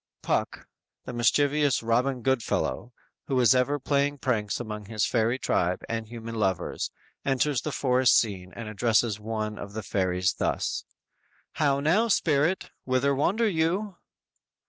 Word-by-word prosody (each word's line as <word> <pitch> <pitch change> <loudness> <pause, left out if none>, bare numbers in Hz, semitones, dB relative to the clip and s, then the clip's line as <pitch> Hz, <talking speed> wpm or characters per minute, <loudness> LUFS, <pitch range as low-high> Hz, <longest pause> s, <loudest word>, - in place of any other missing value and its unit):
"_ - - -51
Puck, - - -1 0.4
the - - -6
mischievous 145 +3 +2
Robin 125 +2 +1
Goodfellow, 120 - -1 0.4
who 130 -2 +1
is 125 0 +6
ever 130 +3 +2
playing 145 +1 0
pranks 110 -7 -1
among 105 -3 -6
his 110 0 -1
fairy 115 +1 +1
tribe 90 -7 0
and 115 -1 -3
human 115 0 -7
lovers, 95 -5 -1 0.3
enters 135 0 +1
the 155 - -3
forest 130 -2 +3
scene 95 -5 -1
and 115 - -6
addresses 110 0 +1
one 110 -1 -4
of 100 - -8
the 110 0 -5
fairies 90 -2 0
thus: - - -2 0.7
_"How 140 -3 +2
now, 180 +10 +3
spirit, 165 -3 +1
whither 130 +2 +1
wander 200 - +1
you?" 180 +2 0
125 Hz, 145 wpm, -27 LUFS, 110-140 Hz, 0.7 s, is